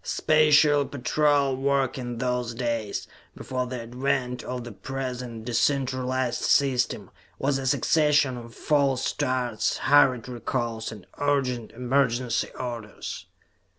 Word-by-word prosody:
Special 150 -1 +4
Patrol 140 0 +1
work 135 -1 +1
in 120 -2 -5
those 125 -1 -2
days, 115 -4 -2 0.3
before 125 -1 -3
the 125 -1 -5
advent 125 +1 -2
of 125 -1 -5
the 120 - -8
present 125 -1 -5
de 120 - -4
centralized 130 -1 0
system, 130 -3 +1 0.3
was 135 0 0
a 135 - -3
succession 150 -1 +3
of 115 -1 -10
false 140 -4 +1
starts, 125 -4 -1
hurried 130 -5 +4
recalls, 120 -2 -3
and 105 -4 -11
urgent, 130 -5 0
emergency 125 -1 0
orders. 120 -4 -6
125 Hz, 120 wpm, -26 LUFS, 120-140 Hz, 0.3 s, Special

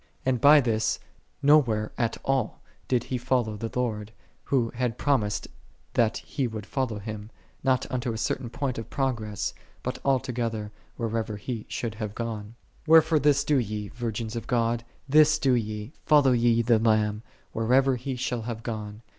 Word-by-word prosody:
And 130 -3 +1
by 145 +1 +8
this 110 -3 +1 0.5
no 150 +2 +8
where 110 -4 -2
at 115 -2 -1
all 135 -1 0 0.3
did 125 -2 +1
he 125 0 -3
fol 125 0 +2
low 110 -1 -5
the 115 +2 -4
Lord, 110 -3 -2 0.3
who 120 -4 +1
had 120 -2 -2
promised 115 -8 0 0.5
that 115 -2 +2
he 135 -4 -2
would 110 -3 -6
follow 125 -3 -2
Him, 105 0 -7 0.3
not 130 -1 +2
unto 125 -2 -1
a 110 - -4
certain 120 +2 -2
point 130 0 -3
of 115 - -7
pro 135 -1 +1
gress, 105 -4 -4 0.3
but - - -3
altogether 115 -5 -1 0.3
whithersoever 110 -2 -2
He 110 +1 -5
should 115 -3 -3
have 110 -2 -5
gone. 110 -2 -5 0.3
53. - - -1
Wherefore 160 -1 +7
this 145 -1 +3
do 150 - +2
ye, 105 -3 -3
virgins 115 -1 -4
of 115 -1 -5
God, 115 -1 +1 0.2
this 155 +2 +6
do 135 -4 +2
ye: 110 +1 -2
follow 145 -4 +5
ye 115 -1 +3
the 115 -1 +4
Lamb, 110 -1 +2 0.3
whithersoever 130 +4 +3
He 130 +2 -4
shall 125 -1 -2
have 115 0 -5
gone. 110 -1 -5
115 Hz, 175 wpm, -27 LUFS, 110-130 Hz, 0.5 s, by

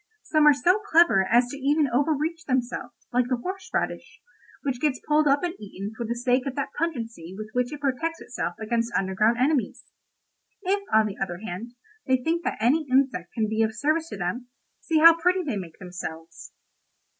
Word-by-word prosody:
Some 310 -1 +3
are 295 - +9
so 360 - +3
clever 330 - +4
as 240 +3 +3
even 285 +2 +2
to 265 - -4
overreach 310 +4 0
themselves, 245 -2 -2 0.2
like 245 0 +2
the 255 - +2
horse 370 +10 -6
radish, - - -3 0.4
which 265 -3 -2
gets 290 -4 +1
pulled 300 0 +3
up 280 +3 +3
and 350 -1 -1
eaten 200 +1 -7
for 235 0 -4
the 235 - -2
sake 250 +2 +1
of 265 - -4
that 280 - -3
pungency 230 - -4
with 215 0 -7
which 250 +1 0
it 295 -1 -7
protects 310 +5 -1
itself 175 -8 -4
against 230 +2 -1
underground 195 +4 +2
enemies. 265 0 0 0.8
If, 400 +2 +1
on 220 0 +5
the 205 -2 -5
other 175 -3 -2
hand, 225 +5 -6 0.3
they 260 0 +4
think 330 +7 -1
that - - -1
any 280 +7 +2
insect 255 -9 +1
can 220 -2 0
be 220 +1 0
of 220 0 0
service 310 +7 0
to 210 - -6
them, 195 +8 -3 0.3
see 325 - 0
how 330 +1 +8
pretty 360 +2 +2
they 275 -9 -2
make 175 -5 -7
themselves. 165 -3 -8
250 Hz, 190 wpm, -25 LUFS, 220-305 Hz, 0.8 s, are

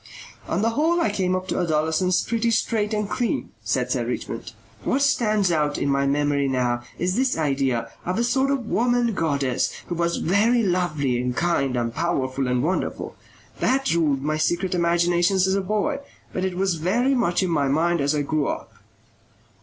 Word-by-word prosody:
"On 185 +5 -1
the 230 - +2
whole 320 +7 +2
I 220 - +1
came 185 -3 0
up 185 0 -4
to - - -1
adolescence 160 +2 +1
pretty 230 0 0
straight 220 -1 0
and 210 -1 -1
clean," 240 +3 -2
said - - -1
Sir - - 0
Richmond. - - -5 0.3
"What 275 - +1
stands 215 -9 +2
out 150 -2 +1
in 140 - -1
my 140 0 +2
memory 145 0 +1
now 125 -2 0 0.2
is 180 +2 -1
this 260 +2 +1
idea, 135 -6 0 0.2
of 180 +1 -2
a 235 - +2
sort 265 +3 +1
of 275 -4 -1
woman 240 +1 +1
goddess 140 -7 0 0.2
who - - -1
was 170 0 0
very 225 +7 +2
lovely 155 - 0
and 125 0 -3
kind 140 -7 +1
and 115 -1 -1
powerful 135 -5 -1
and 125 0 +1
wonderful. 180 +4 -2 0.4
That 270 -2 +1
ruled 150 -5 +1
my 155 +1 0
secret 175 +4 0
imaginations 175 +2 +2
as 190 - +1
a 195 - +1
boy, 215 +9 -1 0.3
but 185 - -2
it 185 -1 -2
was 190 -2 +1
very 230 - +1
much 185 -8 +1
in 180 - -1
my 145 -4 +1
mind 165 +4 +1
as 140 +2 +1
I 145 - 0
grew 150 0 0
up." - - -5
175 Hz, 185 wpm, -23 LUFS, 145-215 Hz, 0.4 s, the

